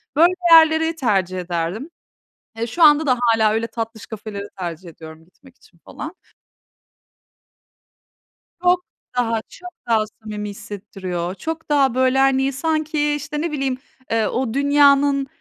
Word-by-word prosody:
böyle 340 Hz, +4 st, +5 dB, 0.2 s
yerleri 320 Hz, 0 st, +6 dB
tercih 195 Hz, -, 0 dB
ederdim. 175 Hz, -, -3 dB, 0.7 s
Eee, 230 Hz, -, -1 dB
şu 335 Hz, +9 st, -2 dB
anda 300 Hz, 0 st, +6 dB
da 255 Hz, -2 st, +2 dB
hâlâ 225 Hz, -3 st, +3 dB
öyle 225 Hz, +1 st, -1 dB
tatlış 225 Hz, -1 st, -6 dB
kafeleri 210 Hz, -2 st, -7 dB
tercih 175 Hz, 0 st, -6 dB
ediyorum 160 Hz, 0 st, -13 dB
gitmek 260 Hz, +9 st, -22 dB
için -, -, -25 dB
falan. -, -, -8 dB, 2.5 s
Çok 360 Hz, 0 st, +3 dB, 0.3 s
daha, 230 Hz, -2 st, +1 dB
çok 360 Hz, -, -10 dB, 0.2 s
daha 225 Hz, -2 st, +3 dB, 0.2 s
samimi 210 Hz, -1 st, -5 dB
hissettiriyor, 185 Hz, -3 st, -6 dB
çok 325 Hz, +5 st, -6 dB
daha 275 Hz, -4 st, +3 dB
böyle, 260 Hz, +1 st, +2 dB
hani, 270 Hz, 0 st, +2 dB
sanki, 310 Hz, 0 st, 0 dB
işte, 295 Hz, +1 st, -4 dB
ne 335 Hz, 0 st, -2 dB
bileyim, 270 Hz, -3 st, -2 dB, 0.3 s
eee, 225 Hz, -2 st, +2 dB
o 250 Hz, -3 st, -2 dB
dünyanın, 280 Hz, 0 st, +4 dB
255 Hz, 130 wpm, -20 LUFS, 210-295 Hz, 2.5 s, yerleri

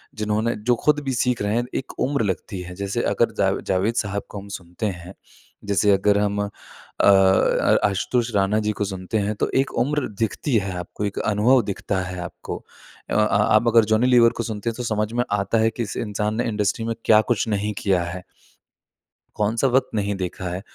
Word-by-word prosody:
जिन्होंने 105 Hz, +2 st, 0 dB
जो 120 Hz, -, +5 dB
खुद 150 Hz, -1 st, +4 dB
भी 135 Hz, -1 st, -2 dB
सीख 125 Hz, 0 st, 0 dB
रहे 105 Hz, +1 st, 0 dB
हैं 120 Hz, +1 st, 0 dB
एक 130 Hz, -, -5 dB
उम्र 140 Hz, -3 st, +1 dB
लगती 95 Hz, 0 st, -3 dB
है 90 Hz, 0 st, -8 dB
जैसे 100 Hz, +1 st, -2 dB
अगर -, -, +2 dB
जावे -, -, +1 dB
जावेद 95 Hz, +5 st, +1 dB
साहब 100 Hz, 0 st, -3 dB
को 100 Hz, -, -7 dB
हम 100 Hz, -, -11 dB
सुनते 90 Hz, +4 st, -7 dB
हैं 90 Hz, -2 st, -5 dB, 0.5 s
जैसे 100 Hz, 0 st, +2 dB
अगर 100 Hz, +1 st, +3 dB
हम 105 Hz, 0 st, 0 dB
अ, 100 Hz, -, -2 dB, 0.6 s
अ 95 Hz, -1 st, +4 dB
आशुतोष 115 Hz, +5 st, -1 dB
राणा 100 Hz, +2 st, +2 dB
जी 105 Hz, 0 st, 0 dB
को -, -, +2 dB
सुनते 95 Hz, +2 st, -3 dB
हैं 105 Hz, 0 st, 0 dB
तो -, -, -1 dB
एक 135 Hz, +1 st, +2 dB
उम्र 145 Hz, +3 st, 0 dB
दिखती 115 Hz, +4 st, -1 dB
है 100 Hz, -2 st, -2 dB
आपको 90 Hz, +3 st, -5 dB
एक 100 Hz, -, -4 dB
अनुभव 110 Hz, +5 st, +3 dB
दिखता 100 Hz, -1 st, -2 dB
है 90 Hz, 0 st, -5 dB
आपको। 85 Hz, -, -6 dB, 0.5 s
अ -, -, -3 dB
अ, -, -, 0 dB
आप 110 Hz, +1 st, +3 dB
अगर 115 Hz, -1 st, +5 dB
जॉनी 110 Hz, +3 st, +2 dB
लीवर 120 Hz, -2 st, +6 dB
को -, -, 0 dB
सुनते 110 Hz, 0 st, -3 dB
हैं, 115 Hz, -, -5 dB
तो 125 Hz, -, -4 dB
समझ 110 Hz, -2 st, -1 dB
में 120 Hz, +1 st, +1 dB
आता 100 Hz, +2 st, +1 dB
है 110 Hz, 0 st, +3 dB
कि 115 Hz, +2 st, -4 dB
इस 100 Hz, -, -6 dB
इंसान 105 Hz, -1 st, -2 dB
ने 120 Hz, -, -1 dB
इंडस्ट्री 105 Hz, 0 st, -1 dB
में 115 Hz, -, -1 dB
क्या 110 Hz, -1 st, +6 dB
कुछ 115 Hz, -1 st, +1 dB
नहीं 105 Hz, 0 st, -1 dB
किया 95 Hz, -3 st, +2 dB
है। 90 Hz, +1 st, -6 dB, 1.1 s
कौन-सा 110 Hz, +5 st, +1 dB
वक़्त 130 Hz, +1 st, +2 dB
नहीं 100 Hz, -1 st, -1 dB
देखा 95 Hz, -1 st, -4 dB
है 90 Hz, +2 st, -4 dB
105 Hz, 210 wpm, -23 LUFS, 100-115 Hz, 1.1 s, लीवर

